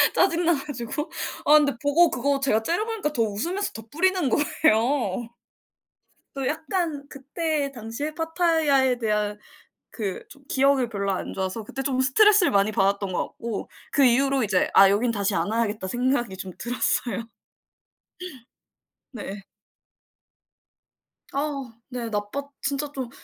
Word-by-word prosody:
짜증나 345 -2 +3
가지고 280 +1 -5 0.3
아 295 - +5
근데 290 -3 +3
보고 320 +4 +4
그거 275 +2 0
제가 260 -5 +2
째려보니까 415 - -1
더 230 -5 +2
웃으면서 330 - -2
더 225 - -8
뿌리는 360 -2 +1
거예요. 240 -6 +1 1.0
또 270 -2 -2
약간 315 -2 -2
그때 285 +1 -2
당시에 240 +5 -5
파타야에 320 -5 +2
대한 210 -2 -1 0.5
그 200 -5 -4
좀 280 - -15
기억이 270 -2 +3
별로 200 -3 -2
안 185 - -4
좋아서 190 +3 -3
그때 270 +6 -6
좀 265 -1 -1
스트레스를 400 +8 +5
많이 200 +1 +3
받았던 200 -1 +1
것 180 - -2
같고 230 -3 -6 0.2
그 280 - +3
이후로 270 +2 +3
이제 195 -4 +1
'아 195 0 +8
여긴 220 +5 +2
다시 205 -2 0
안 - - 0
와야겠다.' 215 -4 -1
생각이 240 -3 0
좀 190 -1 -6
들었어요. 235 -2 -1 1.9
네. 205 -5 -7 1.9
아. 275 -4 -3 0.2
네 245 -3 -4
나빴 205 +6 -3 0.2
진짜 285 0 -2
좀 260 -4 -5
260 Hz, 270 characters per minute, -25 LUFS, 215-295 Hz, 1.9 s, 아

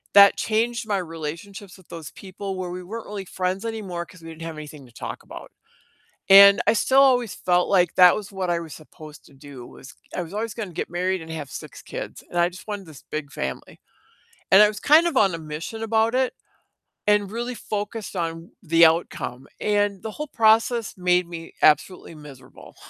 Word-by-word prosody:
that 200 0 +8
changed 230 +1 -1
my 205 -2 0
relationships 175 +4 -7
with 185 - -21
those 165 -3 -8
people, 195 0 -7
where 185 -1 -4
we 180 0 -6
weren't 220 +5 -8
really 200 -2 -6
friends 185 +3 -3
anymore, 195 -7 -4
'cause 180 0 -17
we 165 - -10
didn't 160 0 -11
have 160 -2 -7
anything 150 -2 -10
to 120 - -21
talk - - -7
about. - - -11 0.8
And, 200 0 +9
I - - +5
still 265 +4 +4
always 250 -5 +3
felt 180 0 +1
like 180 -4 +2
that 180 -1 +7
was 210 -1 -7
what 190 -2 -3
I 170 - 0
was 165 -2 -8
supposed 155 -1 -14
to - - -19
do, 135 -2 -12
was 130 - -13 0.2
I - - -1
was 170 +1 -8
always 220 +1 -3
gonna 215 -6 -6
get - - -3
married 185 +1 -1
and 160 0 -9
have 150 -4 -6
6 - - -9
kids, - - -8
and 175 - -6
I 175 0 +3
just 185 +4 -13
wanted 205 -2 -5
this 155 -3 -13
big 150 -2 -4
family. 65 0 -6 0.7
And 195 +2 +8
I 210 - +6
was 210 -1 -5
kind 315 +4 +5
of 330 - -2
on 195 -7 +4
a - - -4
mission 160 +8 -7
about 225 +1 +1
it, 260 0 +1 0.7
and 210 -1 +2
really 240 +3 -4
focused 210 -1 -5
on 165 0 -4
the 165 -2 +5
outcome, 160 -5 -2
and 205 -2 0
the 220 - -5
whole 300 +5 -6
process 225 -1 +2
made 180 -1 +2
me 165 -1 -9
absolutely 165 +3 +2
miserable. 140 -4 -14
185 Hz, 200 wpm, -23 LUFS, 165-210 Hz, 0.8 s, And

